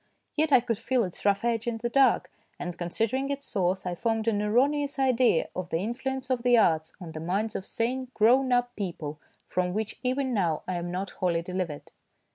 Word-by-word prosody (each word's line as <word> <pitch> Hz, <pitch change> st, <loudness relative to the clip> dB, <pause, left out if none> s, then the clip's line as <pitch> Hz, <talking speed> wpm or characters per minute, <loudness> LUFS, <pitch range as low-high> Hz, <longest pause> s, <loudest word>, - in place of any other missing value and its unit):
Yet 310 Hz, 0 st, +1 dB
I 260 Hz, -3 st, +7 dB
could 230 Hz, -3 st, -2 dB
feel 245 Hz, 0 st, +1 dB
its 180 Hz, 0 st, -7 dB
rough 200 Hz, +2 st, +2 dB
edge 230 Hz, -1 st, 0 dB
in 235 Hz, -1 st, -1 dB
the 235 Hz, +2 st, -2 dB
dark; 260 Hz, 0 st, +3 dB, 0.3 s
and 175 Hz, -1 st, -5 dB
considering 225 Hz, +10 st, -1 dB
its 280 Hz, 0 st, -3 dB
source, 190 Hz, -2 st, -1 dB
I 180 Hz, -, -1 dB
formed 225 Hz, +3 st, -1 dB
an 210 Hz, -2 st, +2 dB
erroneous 280 Hz, +7 st, +2 dB
idea 255 Hz, -9 st, +3 dB
of 180 Hz, -1 st, -4 dB
the 165 Hz, -, 0 dB
influence 260 Hz, +6 st, -3 dB
of 250 Hz, -2 st, +1 dB
the 245 Hz, 0 st, +5 dB
arts 160 Hz, -7 st, +2 dB
on 175 Hz, -4 st, -8 dB
the 155 Hz, -, -6 dB
minds 195 Hz, +7 st, -1 dB
of 190 Hz, -, -4 dB
sane 255 Hz, +3 st, -1 dB
grown 255 Hz, +4 st, +4 dB
up 245 Hz, 0 st, +2 dB
people, 160 Hz, -6 st, -5 dB, 0.3 s
from 180 Hz, 0 st, -1 dB
which 215 Hz, 0 st, -3 dB
even 260 Hz, 0 st, 0 dB
now 170 Hz, -8 st, 0 dB
I 185 Hz, -, -1 dB
am 175 Hz, 0 st, -3 dB
not 185 Hz, +2 st, -3 dB
wholly 170 Hz, -2 st, 0 dB
delivered. 180 Hz, -4 st, -4 dB
220 Hz, 205 wpm, -28 LUFS, 180-250 Hz, 0.3 s, I